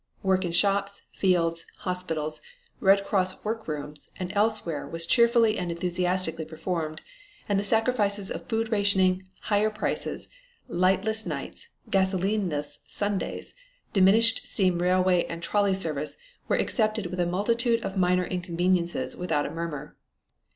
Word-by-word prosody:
Work 190 -1 +2
in 175 - -2
shops, 200 +2 +1
fields, 170 -3 +1
hospitals, 165 -4 -3 0.4
Red 195 0 +4
Cross 185 -2 0
work 225 +1 -3
rooms 150 -1 -4
and 185 +1 -4
elsewhere 205 -7 0
was 165 0 -3
cheerfully 235 +1 +4
and 180 -1 -3
enthusiastically 180 -1 0
performed 160 0 -4 0.5
and 200 -1 +2
the - - -1
sacrifices 210 -2 +1
of - - -6
food 225 -1 -1
rationing, 190 -3 +2
higher 210 +1 +2
prices, 215 0 -3 0.4
lightless 195 +5 +1
nights, - - -5 0.2
gasolineless 190 -6 0
Sundays, 205 -1 -3 0.4
diminished 220 +4 +4
steam 185 -3 +1
railway 180 0 +3
and 170 0 -7
trolley 200 +1 +2
service 155 -5 -3 0.3
were - - +2
accepted 215 -2 0
with 180 +1 -5
a 175 - +2
multitude 230 +5 +1
of 195 - -4
minor 180 -1 +2
inconvenience 175 -1 0 0.2
without 160 -5 -1
a - - -4
murmur. 165 -3 -5
185 Hz, 130 wpm, -27 LUFS, 170-205 Hz, 0.5 s, Red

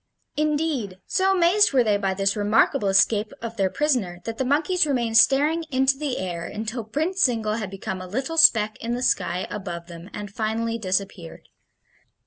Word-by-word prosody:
Indeed, 295 - -1
so 385 0 +1
amazed 370 +1 +3
were 255 -2 +4
they 210 -2 +2
by 195 -1 -2
this 195 0 0
remarkable 210 0 +2
escape 205 +2 +2
of 230 0 -6
their 195 -3 0
prisoner 235 -11 -1
that 225 0 -6
the - - +1
monkeys 310 +6 +1
remained 235 -5 +2
staring 295 +7 +3
into 265 0 +2
the 280 -2 -3
air 175 -2 -4
until 220 +2 -5
Prince 315 - -1
Zingle 225 -4 +1
had 210 -4 -4
become 190 -1 -6
a 185 - -8
little 265 - -4
speck 220 -8 +5
in 235 +1 -2
the 250 - -4
sky 180 -6 0
above 175 -4 -6
them 170 +1 -11
and 205 -1 -8
finally 225 +2 -2
disappeared. 185 - -4
225 Hz, 175 wpm, -23 LUFS, 195-275 Hz, -, speck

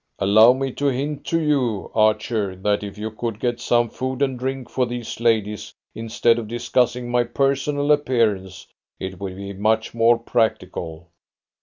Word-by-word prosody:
"Allow 110 +5 +6
me 135 0 -2
to 145 +3 -1
hint 140 +2 -2
to 165 - +1
you, 135 -10 0
Archer, 110 -2 +1
that 105 +2 0
if 100 -1 -7
you 110 +1 -4
could 110 -1 -4
get 120 -1 -1
some 120 0 +2
food 130 +3 -3
and 130 -3 -1
drink 130 0 -3
for 125 -2 -1
these 120 -2 -6
ladies, 110 -3 0 0.2
instead 115 +1 +1
of 110 - -6
discussing 120 +1 0
my 120 0 +3
personal 140 +4 0
appearance, 115 -10 0 0.3
it 95 -1 -6
would 95 -2 -5
be 100 +1 -7
much 110 +3 0
more 115 0 +4
practical." 90 -8 -2
115 Hz, 160 wpm, -22 LUFS, 105-130 Hz, 0.3 s, Allow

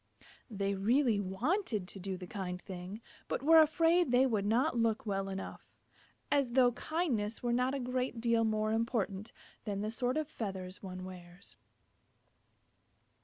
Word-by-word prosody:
They 200 -2 -1
really 225 +3 +2
wanted 210 - -1
to 195 - -7
do 190 0 -4
the 180 - -7
kind 180 -1 -5
thing, 185 +4 -8 0.3
but - - -2
were 325 +2 +8
afraid 330 +1 +3
they 250 +2 +5
did 215 -6 0
not 245 +6 +2
look 230 -1 +1
well 195 -2 -1
enough. 195 0 -7 0.6
As 275 -4 +2
though 250 -1 +5
kindness 245 -7 -2
were 240 -1 +1
not 250 +2 +1
a - - -2
great 250 -1 -2
deal 230 -1 +2
more 215 -1 +1
important 220 -3 -1 0.3
than 200 -2 -3
the 215 +1 -2
sort 250 +3 -1
of 310 -2 -1
feathers 190 -9 -5
one 185 -1 -7
wears! 180 0 -10
225 Hz, 155 wpm, -33 LUFS, 195-255 Hz, 0.6 s, were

